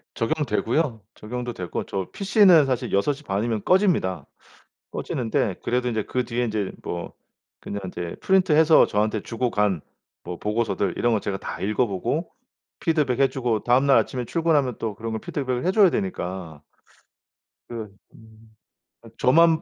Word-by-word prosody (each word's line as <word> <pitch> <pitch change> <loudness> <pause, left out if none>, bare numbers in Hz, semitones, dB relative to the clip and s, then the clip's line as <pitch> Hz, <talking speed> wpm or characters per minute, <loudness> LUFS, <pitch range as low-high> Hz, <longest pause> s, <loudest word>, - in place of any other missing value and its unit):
적용되고요. 135 0 0
적용도 120 +2 -5
되고 90 -6 -4
저 95 -2 -3
PC는 195 -6 +5
사실 130 -3 -2
6 100 +9 +2
시 145 +2 -13
반이면 105 0 -1
꺼집니다. 170 - +2 0.7
꺼지는데 110 -5 -1
그래도 125 +1 0
인제 110 -3 -1
그 125 0 -1
뒤에 120 +1 -1
인제 105 -4 -2
뭐 85 0 -5 0.5
그냥 100 - -5
인제 85 -2 -6
프린트해서 160 -4 +5
저한테 105 +1 0
주고 120 +1 -2
간 105 -7 +1 0.4
뭐 90 - -5
보고서들 105 0 -1
이런 120 -1 +2
거 110 - +1
제가 100 -1 -3
다 - - -7
읽어 110 +5 +1
보고 120 - -2 0.5
피드백 150 -6 +1
해 135 - +5
주고 120 -6 -1
다음날 130 +3 +4
아침에 125 -1 -1
출근하면 150 -4 +1
또 110 -2 -3
그런 115 +2 -5
걸 110 - -3
피드백을 130 -2 -3
해 185 - +2
줘야 205 -2 +6
되니까. 95 - -4 1.1
그 115 -3 -6 0.2
음 110 0 -18 0.5
아 - - -14
저만 165 +4 +4
120 Hz, 320 characters per minute, -24 LUFS, 105-145 Hz, 1.1 s, 줘야